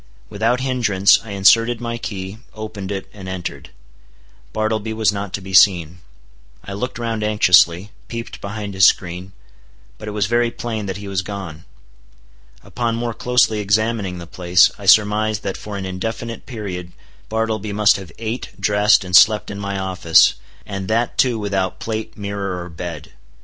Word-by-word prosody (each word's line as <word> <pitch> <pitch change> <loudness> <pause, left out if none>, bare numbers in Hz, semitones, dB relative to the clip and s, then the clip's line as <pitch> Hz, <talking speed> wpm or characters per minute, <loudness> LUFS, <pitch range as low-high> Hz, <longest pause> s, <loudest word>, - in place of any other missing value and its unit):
Without 115 +4 0
hindrance 115 -7 +3
I 115 - -11
inserted 115 +4 +4
my 120 -1 -4
key, 95 -1 -6 0.2
opened 105 -3 -6
it, 95 -1 -4
and 95 -3 -9
entered. 95 -2 -6 0.8
Bartleby 110 0 -1
was 110 -3 +2
not 100 -1 -5
to 100 - -3
be 95 0 -9
seen. 90 -3 +4 0.6
I 100 - -7
looked 125 +6 -4
round 115 -2 -3
anxiously, 95 -2 +4 0.2
peeped 115 0 -7
behind 100 0 -5
his 95 0 +1
screen; 90 +1 +2 0.7
but 105 - -8
it 105 0 -5
was 100 - +2
very 120 +3 +1
plain 110 -3 -5
that 95 0 -4
he 100 0 -8
was 95 -2 -1
gone. 90 -5 -7 1.0
Upon 120 -2 -2
more 115 0 -3
closely 120 -2 +2
examining 105 -2 0
the 85 - -8
place, 90 +1 +3
I 100 - -8
surmised 110 +1 +4
that 95 - -3
for 105 -1 -7
an 95 - -5
indefinite 110 +5 -5
period 95 -7 -6 0.4
Bartleby 110 -1 -2
must 105 0 +4
have 95 -5 -10
ate, 115 +1 -4
dressed, 105 0 +3
and 90 -1 -1
slept 105 +4 +5
in 100 - -6
my 100 -1 -3
office, 95 -4 +4 0.3
and 100 -2 -5
that 115 +2 0
too 125 -3 +2
without 100 -3 -2
plate, 110 -1 -5
mirror, 100 -2 -4
or 90 - -9
bed. 85 -1 -7
105 Hz, 165 wpm, -20 LUFS, 95-110 Hz, 1.0 s, slept